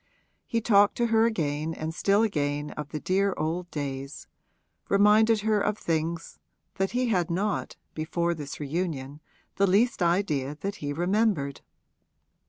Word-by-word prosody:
He 230 - 0
talked 205 -2 +4
to 240 - +2
her 225 +1 +5
again 160 -6 -2
and 160 +1 -4
still 200 +5 +2
again 145 -7 -1
of 150 -1 -6
the 155 - -4
dear 195 +3 +1
old 170 +3 -2
days 140 -2 -5 0.6
reminded 210 +2 +5
her 215 -1 +2
of 210 +1 0
things 165 -1 -3 0.4
that 195 +2 -1
he 250 -1 +1
had 180 -6 +1
not 195 +4 -1 0.2
(before 170 +2 -1
this 145 -4 -7
reunion) 150 -2 -3 0.4
the 200 +1 +4
least 210 +4 +2
idea 155 -6 0
that 200 +1 -3
he 145 -1 -4
remembered. 175 -3 0
175 Hz, 145 wpm, -27 LUFS, 150-205 Hz, 0.6 s, her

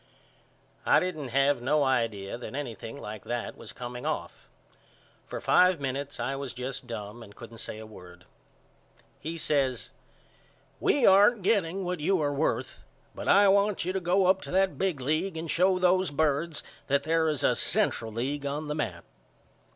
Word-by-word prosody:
I - - +5
didn't 155 -6 -3
have 135 +1 +2
no 145 +4 +2
idea 115 -7 0
that 120 +2 -8
anything 120 -2 -6
like 105 -4 -7
that 120 -1 -4
was - - -10
coming 125 0 -7
off. 150 - -4 0.8
For - - -5
five 180 -2 +4
minutes 140 +1 -4
I 135 - -2
was 135 -3 -6
just 125 0 -5
dum 110 0 -7
and 105 -2 -13
couldn't 115 -1 -11
say 105 - -6
a 110 - -9
word. 90 -4 -14 0.9
He 165 +3 -5
says 135 -6 0 0.9
We 280 -5 +2
aren't 200 +2 +6
getting 190 -2 +1
what 180 -1 -3
you 185 +5 +1
are 145 -2 0
worth 145 +3 -1 0.3
but - - -7
I 200 0 +6
want 200 -1 +2
you 185 - -1
to 190 - 0
go 185 +2 +2
up 190 +1 +3
to - - -8
that 190 +1 +1
big 185 -8 0
league 160 +7 -1
and 160 -1 -3
show 185 +3 +3
those 185 0 +3
birds 150 +2 0 0.2
that 140 0 +2
there 160 +1 +2
is 150 -4 -1
a - - +3
Central 110 - +1
League 135 +6 -3
on 150 +2 -4
the - - 0
map. 90 - -4
145 Hz, 175 wpm, -28 LUFS, 125-180 Hz, 0.9 s, aren't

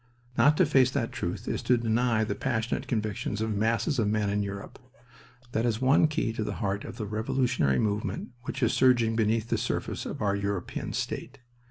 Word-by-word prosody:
Not 145 +2 +5
to - - +5
face 135 -3 +4
that 115 -2 -2
truth 95 +5 -4
is - - -1
to 125 - +3
deny 115 0 +1
the 110 - -1
passionate 115 -3 -2
convictions 105 -2 -2
of 110 -1 -1
masses 115 +5 +1
of 110 - +2
men 105 -1 +1
in 105 0 +1
Europe. 100 0 -6 0.7
That 115 - 0
is 115 -2 0
one 135 +4 +5
key 135 -6 -1
to 110 - -2
the - - -3
heart 100 -2 -2
of - - -8
the 105 - -3
revolutionary 110 - +1
movement 105 -1 -1 0.2
which 135 - -3
is 115 - +3
surging 120 -3 +4
beneath 110 +1 +1
the - - +1
surface - - -2
of - - -5
our 100 -2 +1
European 100 -2 -3
state. 135 +3 -4
110 Hz, 195 wpm, -28 LUFS, 105-120 Hz, 0.7 s, Not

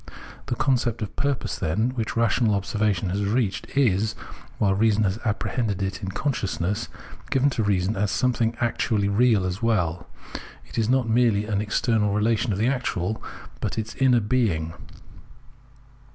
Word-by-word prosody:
The - - -1
concept 120 -3 0
of 105 - -7
purpose 140 -2 -1
then, 110 +10 0
which 115 -3 -3
rational 115 -1 +2
observation 100 -2 0
has 100 +2 -1
reached, 105 0 0
is, 110 -4 +2 0.4
while 100 -2 +2
reason 110 +1 +3
has 100 +2 0
apprehended 105 -2 -1
it 95 0 -3
in 95 - -4
consciousness, 100 - -2 0.4
given 135 +2 +2
to 115 - -1
reason 100 0 +1
as 100 +1 0
something 120 -1 0
actually 110 -3 0
real 110 -2 +3
as 95 +3 -3
well; 90 -7 0 0.6
it - - -5
is 110 0 +1
not 130 -2 +2
merely 110 -3 +3
an 105 -2 -1
external 105 -1 +1
relation 110 +2 +1
of 95 - -1
the 110 - +1
actual, 110 -6 -1 0.4
but - - -3
its 110 0 -3
inner 125 -3 +3
being. 100 -9 0
110 Hz, 150 wpm, -24 LUFS, 100-120 Hz, 0.6 s, reason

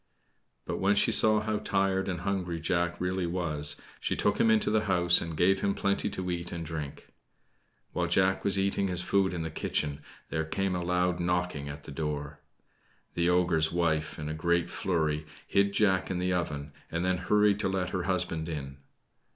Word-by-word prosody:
But - - -3
when 100 +2 +3
she - - +4
saw 110 -1 +5
how 110 -1 -1
tired 95 0 0
and 90 -2 -3
hungry 90 -3 -2
Jack 85 +1 0
really 90 0 -1
was, 75 -4 -1 0.2
she - - -1
took - - +1
him 115 - +4
into 110 -1 +3
the 110 0 +2
house 90 -3 +5
and 85 -2 -5
gave 95 +3 +3
him 100 -1 +1
plenty 100 0 0
to 90 -1 -3
eat 85 0 -4
and 85 -1 -5
drink. 75 -3 -6 0.8
While 90 -1 0
Jack 95 +2 +2
was 100 0 +1
eating 100 0 +1
his 90 -1 0
food 95 0 +2
in 85 -2 -3
the 80 - -4
kitchen 75 -2 -2 0.3
there 80 -1 0
came 95 +4 -1
a 90 - -2
loud 90 0 +1
knocking 90 -4 -1
at 70 +1 -8
the - - -9
door. 75 -1 -4 0.7
The 85 0 +1
ogre's 85 -3 +3
wife, 80 -3 0
in 75 - -5
a 75 - -3
great 85 +2 0
flurry, 80 -6 -1 0.2
hid 100 0 +2
Jack 95 -3 +2
in 95 - -2
the 90 +1 0
oven, 75 -4 -3 0.2
and 85 +2 -2
then 90 0 +1
hurried 105 +2 +3
to 95 - 0
let 95 -1 -1
her 90 0 -2
husband 85 -3 -1
in. 70 -3 -5
90 Hz, 190 wpm, -29 LUFS, 80-95 Hz, 0.8 s, saw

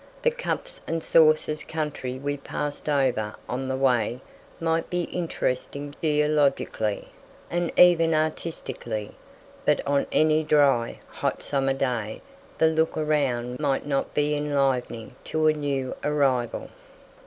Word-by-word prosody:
The 485 - +4
"cups 485 +1 -4
and 165 -1 -2
saucers" 155 -1 +4
country 150 -5 -4
we 145 +2 -2
passed 145 +1 -4
over 125 -7 +1
on 130 +2 -3
the 130 - -1
way 125 -3 +2 0.4
might 165 0 0
be 180 0 0
interesting 145 -4 -3
geologically, 150 -8 +1 0.4
and 175 -1 0
even 165 -2 +6
artistically; 155 -8 -3 0.5
but - - +3
on 140 0 +1
any 155 0 +3
dry, 140 -6 +3
hot - - -3
summer 135 -1 0
day 120 -5 -2 0.3
the - - +4
look 160 0 +2
around 130 -6 0
might 140 -3 0
not 140 -2 -1
be 150 0 +2
enlivening 135 -5 -1
to 155 0 0
a 155 - +5
new 140 -3 -2
arrival. 135 -5 0
145 Hz, 125 wpm, -25 LUFS, 130-155 Hz, 0.5 s, even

